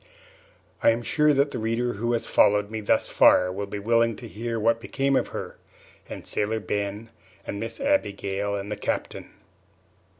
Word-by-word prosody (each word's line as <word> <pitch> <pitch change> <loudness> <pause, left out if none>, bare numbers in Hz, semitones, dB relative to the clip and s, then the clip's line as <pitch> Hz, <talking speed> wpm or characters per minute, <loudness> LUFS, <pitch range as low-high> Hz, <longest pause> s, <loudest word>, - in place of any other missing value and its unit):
I - - +5
am 115 +1 +1
sure 150 +4 +3
that 140 0 +2
the - - -4
reader 115 +2 -1
who 120 +4 -1
has 115 - -1
followed 105 0 +3
me 110 -1 -4
thus 105 - +2
far 90 0 +4
will 100 +2 -4
be 105 - -5
willing 115 +2 +2
to 120 - -9
hear 115 +2 -4
what 115 +1 +2
became 135 +2 0
of - - +1
her, - - -7 0.5
and - - -8
Sailor 110 +2 -1
Ben 105 +1 -4 0.3
and 100 - -5
Miss 115 +1 -5
Abigail 100 - -1
and 100 +1 -5
the 105 - -3
Captain. - - -4
110 Hz, 175 wpm, -25 LUFS, 100-120 Hz, 0.5 s, I